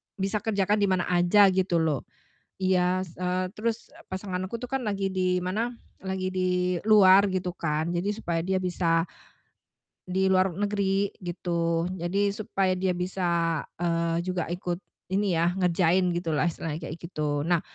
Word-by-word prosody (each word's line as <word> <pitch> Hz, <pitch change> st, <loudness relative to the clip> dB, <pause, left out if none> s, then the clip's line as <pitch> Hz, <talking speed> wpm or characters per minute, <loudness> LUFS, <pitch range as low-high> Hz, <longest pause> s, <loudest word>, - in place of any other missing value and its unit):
bisa 195 Hz, +2 st, -1 dB
kerjakan 205 Hz, -1 st, +1 dB
di 200 Hz, -, +3 dB
mana 185 Hz, -2 st, +1 dB
aja 185 Hz, +3 st, +5 dB
gitu 185 Hz, -1 st, +1 dB
loh. 160 Hz, -4 st, 0 dB, 0.6 s
Iya 185 Hz, 0 st, +2 dB
s 175 Hz, -, -11 dB
eee, 180 Hz, 0 st, -1 dB
terus 225 Hz, +3 st, -3 dB
e 330 Hz, +3 st, -16 dB
pasangan 190 Hz, -1 st, -4 dB
aku 235 Hz, -, -5 dB
tuh 250 Hz, +2 st, -7 dB
kan 270 Hz, -, 0 dB
lagi 195 Hz, -1 st, -1 dB
di 185 Hz, -1 st, 0 dB
mana, 205 Hz, +6 st, -1 dB, 0.3 s
lagi 190 Hz, -1 st, -3 dB
di 180 Hz, -1 st, 0 dB
luar 200 Hz, -2 st, +7 dB
gitu 185 Hz, -1 st, -2 dB
kan, 160 Hz, -1 st, -2 dB
jadi 175 Hz, +2 st, -1 dB
supaya 170 Hz, -6 st, -2 dB
dia 190 Hz, +3 st, -1 dB
bisa 175 Hz, -3 st, +1 dB, 1.0 s
di 190 Hz, +1 st, +1 dB
luar 185 Hz, 0 st, +3 dB
negeri 200 Hz, +1 st, 0 dB
gitu. 170 Hz, -2 st, -1 dB
Jadi 190 Hz, +4 st, 0 dB
supaya 195 Hz, -2 st, -1 dB
dia 185 Hz, 0 st, +1 dB
bisa, 170 Hz, -3 st, 0 dB, 0.2 s
eee, 170 Hz, -1 st, 0 dB
juga 180 Hz, 0 st, -2 dB
ikut 175 Hz, -1 st, -2 dB, 0.3 s
ini 195 Hz, +1 st, +1 dB
ya, 170 Hz, +2 st, +1 dB
ngerjain 180 Hz, 0 st, +2 dB
gitu 175 Hz, 0 st, -3 dB
loh -, -, +2 dB
istilahnya 165 Hz, -2 st, -2 dB
kayak 160 Hz, -, -5 dB
gitu. 150 Hz, -4 st, -2 dB
Nah, 175 Hz, -2 st, +3 dB
185 Hz, 160 wpm, -27 LUFS, 175-195 Hz, 1.0 s, luar